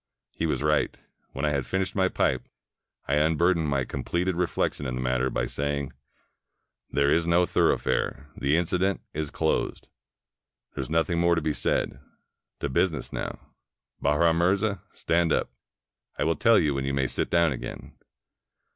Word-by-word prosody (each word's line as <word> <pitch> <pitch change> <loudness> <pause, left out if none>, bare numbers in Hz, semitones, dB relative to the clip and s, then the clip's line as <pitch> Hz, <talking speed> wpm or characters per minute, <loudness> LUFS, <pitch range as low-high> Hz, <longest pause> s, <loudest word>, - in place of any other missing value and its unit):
He 80 - -2
was 75 - -1
right. 75 0 +1 0.4
When 70 +3 -2
I 75 - +2
had 70 -2 0
finished 95 +5 -1
my 95 -2 +3
pipe, 65 -7 0 0.6
I 75 +2 +2
un 80 +1 +2
burdened 85 -2 +2
my 70 -2 0
completed 90 +6 -2
reflection 85 -5 -1
in 65 - -3
the 65 - -3
matter 65 +1 +1
by - - -1
saying 70 -1 -3 0.5
— - - -55
"There 70 0 +3
is 85 0 +1
no 85 +1 +4
thoroughfare; 75 -2 +1
the 70 +3 +1
incident 90 +2 0
is 75 -1 -3
closed. - - -1 0.8
There - - -3
is 65 - -6
nothing 80 +2 +1
more 85 0 +4
to - - +1
be 75 - 0
said. - - -1 0.6
To - - 0
business 75 +1 0
now.... - - -6 0.5
Bahram 80 +2 +3
Mirza, 100 +2 +1
stand 85 0 +1
up. - - +1 0.7
I - - 0
will 80 +2 +2
teU 115 0 +4
you 75 -3 +2
when 70 0 -2
you 70 0 -1
may 65 -1 +1
sit - - -1
down 85 -2 +3
again." 65 - -7
80 Hz, 170 wpm, -27 LUFS, 70-85 Hz, 0.8 s, no